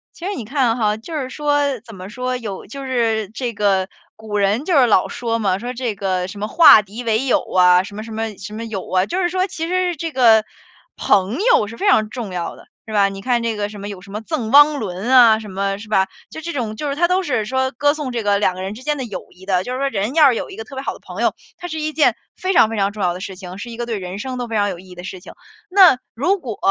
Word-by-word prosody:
其 345 Hz, -, -9 dB
实 405 Hz, -, -2 dB
你 240 Hz, -, -5 dB
看 245 Hz, -1 st, +1 dB
哈， 210 Hz, -2 st, +1 dB
就 275 Hz, +10 st, -10 dB
是 270 Hz, -4 st, -3 dB
说， 290 Hz, -1 st, 0 dB
怎 225 Hz, -3 st, -13 dB
么 185 Hz, +1 st, -9 dB
说， 255 Hz, +3 st, -3 dB
有 215 Hz, -6 st, -6 dB
就 275 Hz, +7 st, -8 dB
是 225 Hz, -5 st, 0 dB
这 235 Hz, +1 st, -4 dB
个 195 Hz, -3 st, +1 dB, 0.3 s
古 220 Hz, -1 st, -5 dB
人 205 Hz, +7 st, +1 dB
就 365 Hz, -, 0 dB
是 255 Hz, -, +6 dB
老 200 Hz, -4 st, +3 dB
说 230 Hz, -1 st, -2 dB
嘛， 195 Hz, -3 st, 0 dB
说 245 Hz, +3 st, -5 dB
这 240 Hz, -3 st, -3 dB
个 185 Hz, -2 st, -1 dB
什 200 Hz, +2 st, -9 dB
么 210 Hz, -, -2 dB
“化 300 Hz, -8 st, +8 dB
敌 210 Hz, +5 st, -9 dB
为 225 Hz, +2 st, 0 dB
友” 260 Hz, -, +3 dB
啊， 180 Hz, 0 st, +5 dB
什 200 Hz, +1 st, -10 dB
么 215 Hz, -, -6 dB
什 225 Hz, -, -10 dB
么 220 Hz, -1 st, -4 dB
什 210 Hz, +2 st, -8 dB
么 225 Hz, +2 st, -5 dB
友 210 Hz, -4 st, -6 dB
啊， 185 Hz, 0 st, +3 dB
就 360 Hz, -, -2 dB
是 350 Hz, -, +1 dB
说 370 Hz, +1 st, 0 dB
其 335 Hz, -4 st, -5 dB
实 365 Hz, 0 st, 0 dB
这 325 Hz, +2 st, -4 dB
个， 230 Hz, -5 st, +5 dB, 0.5 s
朋 195 Hz, +4 st, +2 dB
友 215 Hz, -, +4 dB
是 230 Hz, +2 st, -9 dB
非 410 Hz, -, -1 dB
常 215 Hz, -, +4 dB
重 220 Hz, -5 st, -6 dB
要 175 Hz, -2 st, -4 dB
的， -, -, -16 dB, 0.2 s
是 220 Hz, -, -7 dB
吧？ 200 Hz, -2 st, +4 dB
你 195 Hz, 0 st, -7 dB
看 245 Hz, +1 st, +1 dB
这 230 Hz, -1 st, -1 dB
个 205 Hz, 0 st, -2 dB
什 210 Hz, -, -10 dB
么， 200 Hz, -, -6 dB
有 200 Hz, -3 st, -8 dB
什 195 Hz, +1 st, -14 dB
么 210 Hz, -, -4 dB
《赠 245 Hz, -7 st, -3 dB
汪 290 Hz, +1 st, +7 dB
伦》 190 Hz, -1 st, -5 dB
啊 240 Hz, -4 st, +7 dB
什 215 Hz, -2 st, -9 dB
么 195 Hz, +1 st, -2 dB
是 210 Hz, +2 st, -11 dB
吧？ 190 Hz, -3 st, +3 dB, 0.2 s
就 315 Hz, -, -8 dB
这 340 Hz, +2 st, -5 dB
种 230 Hz, -5 st, -3 dB
就 290 Hz, +6 st, -3 dB
是 280 Hz, -, -2 dB
它 345 Hz, +4 st, +3 dB
都 365 Hz, +2 st, +2 dB
是 250 Hz, -10 st, -1 dB
说 260 Hz, +3 st, 0 dB
歌 290 Hz, +3 st, +2 dB
颂 300 Hz, -4 st, -4 dB
这 235 Hz, -2 st, -3 dB
个 205 Hz, -1 st, +2 dB
2 185 Hz, -3 st, +1 dB
个 185 Hz, -, -7 dB
人 190 Hz, +2 st, -4 dB
之 225 Hz, -, -11 dB
间 300 Hz, +1 st, -1 dB
的 265 Hz, -, -3 dB
友 210 Hz, -5 st, -7 dB
谊 185 Hz, +1 st, -16 dB
的。 185 Hz, -2 st, +1 dB
就 250 Hz, -, -6 dB
是 255 Hz, -, -3 dB
说 275 Hz, -, +1 dB
人 215 Hz, +1 st, -2 dB
要 310 Hz, -3 st, +7 dB
是 250 Hz, -, +1 dB
有 -, -, -4 dB
一 -, -, -9 dB
个 225 Hz, -, -5 dB
特 270 Hz, -, -11 dB
别 265 Hz, -, -4 dB
好 -, -, -3 dB
的 -, -, -13 dB
朋 -, -, -8 dB
友， -, -, +2 dB, 0.2 s
它 355 Hz, -, -7 dB
是 315 Hz, -, -4 dB
一 310 Hz, 0 st, -3 dB
件 300 Hz, -, +3 dB, 0.2 s
非 370 Hz, -, -2 dB
常 225 Hz, -, +6 dB
非 225 Hz, -, -4 dB
常 200 Hz, 0 st, +1 dB
重 205 Hz, -1 st, -5 dB
要 175 Hz, -1 st, +1 dB
的 180 Hz, -, -8 dB
事 190 Hz, 0 st, -6 dB
情， 185 Hz, -1 st, -9 dB
是 240 Hz, -, -7 dB
一 230 Hz, -, -8 dB
个 240 Hz, -, -3 dB
对 230 Hz, -3 st, -3 dB
人 180 Hz, 0 st, -6 dB
生 255 Hz, +3 st, -5 dB
都 245 Hz, -, -3 dB
非 230 Hz, -, -4 dB
常 205 Hz, -1 st, +2 dB
有 180 Hz, -3 st, -6 dB
意 185 Hz, +1 st, -15 dB
义 180 Hz, -, -11 dB
的 175 Hz, -, -9 dB
事 190 Hz, -1 st, -7 dB
情。 -, -, -12 dB, 0.4 s
那， 365 Hz, -7 st, +7 dB, 0.2 s
如 360 Hz, -, +1 dB
果， 240 Hz, -9 st, -6 dB
225 Hz, 320 characters per minute, -20 LUFS, 200-270 Hz, 0.5 s, 化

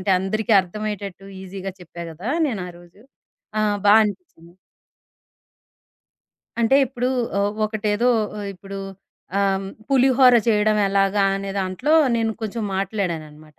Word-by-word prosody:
అంటే 185 Hz, -, -1 dB
అందరికీ 215 Hz, +4 st, -1 dB
అర్థమయ్యేటట్టు 200 Hz, 0 st, -6 dB, 0.2 s
ఈజీగా 190 Hz, 0 st, -6 dB
చెప్పా 170 Hz, 0 st, -9 dB
గదా! 180 Hz, +10 st, -5 dB, 0.2 s
నేనారోజు. 180 Hz, -4 st, -8 dB, 0.6 s
ఆ! -, -, +2 dB, 0.3 s
బా 205 Hz, -, +7 dB
అనిపిచ్చింది. 200 Hz, -, -8 dB, 2.1 s
అంటే 235 Hz, +4 st, +4 dB
ఇప్పుడు 250 Hz, 0 st, -2 dB, 0.3 s
ఆహ్, 205 Hz, +1 st, +1 dB
ఒకటేదో 215 Hz, +2 st, 0 dB, 0.3 s
ఆహ్, 205 Hz, -, -5 dB
ఇప్పుడు 195 Hz, +1 st, -9 dB, 0.6 s
ఆహ్, 195 Hz, -1 st, +1 dB, 0.2 s
పులిహోర 260 Hz, -2 st, +5 dB
చేయడం 215 Hz, -1 st, +3 dB
ఎలాగా, 195 Hz, 0 st, +2 dB
అనే 195 Hz, 0 st, -5 dB
దాంట్లో 190 Hz, +11 st, -1 dB, 0.2 s
నేను 225 Hz, -1 st, 0 dB
కొంచెం 220 Hz, +1 st, -3 dB
మాట్లాడాననమాట. 160 Hz, -7 st, -4 dB
200 Hz, 110 wpm, -22 LUFS, 185-220 Hz, 2.1 s, బా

